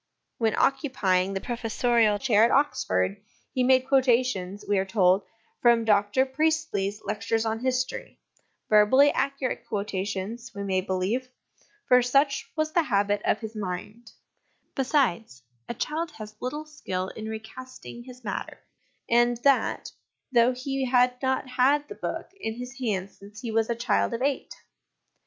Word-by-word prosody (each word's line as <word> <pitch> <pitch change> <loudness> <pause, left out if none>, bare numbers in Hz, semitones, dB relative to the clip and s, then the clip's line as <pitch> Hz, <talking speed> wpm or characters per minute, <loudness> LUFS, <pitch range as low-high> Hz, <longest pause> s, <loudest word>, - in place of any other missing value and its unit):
When 225 -2 +1
occupying 195 -9 +1
the 195 - -2
professorial 230 -2 +1
chair 220 -2 +3
at 230 - +5
Oxford, 95 - +1 0.3
he 260 - 0
made 260 0 +4
quotations, 245 -8 +1
we 205 -1 +2
are - - +1
told, 190 -1 +3 0.4
from 235 -1 +4
Dr 205 +4 +3
Priestley's 270 -8 -1
Lectures 225 +2 -1
on 225 0 -1
History, 255 - -2 0.5
verbally 240 +7 +6
accurate 275 -2 -2
quotations, 205 +3 -4
we 200 - -4
may 190 -1 0
believe, 190 +7 -2 0.6
for 250 0 +6
such 275 +3 +1
was 310 -1 0
the 340 - +3
habit 205 -6 +1
of 215 - +1
his 220 0 -7
mind; 205 +4 -6 0.6
besides, 235 - 0 0.3
a - - -3
child 320 +7 -2
has 215 -5 -9
little 295 +5 -4
skill 190 -12 -4
in 220 0 -7
recasting 240 +2 -9
his 250 -1 -12
matter 200 -3 -5 0.5
and 240 0 +3
that, 275 -2 +2 0.4
though 240 0 +5
he 270 +2 -3
had 250 0 +2
not 265 0 0
had 270 +4 +2
the - - -7
book - - -5
in 220 - -4
his 250 +2 -8
hands 200 -6 -3
since 205 +2 -12
he 235 - -4
was 225 0 +1
a 235 - 0
child 235 0 0
of 240 - -3
eight. 280 -1 -1
235 Hz, 145 wpm, -26 LUFS, 205-260 Hz, 0.6 s, verbally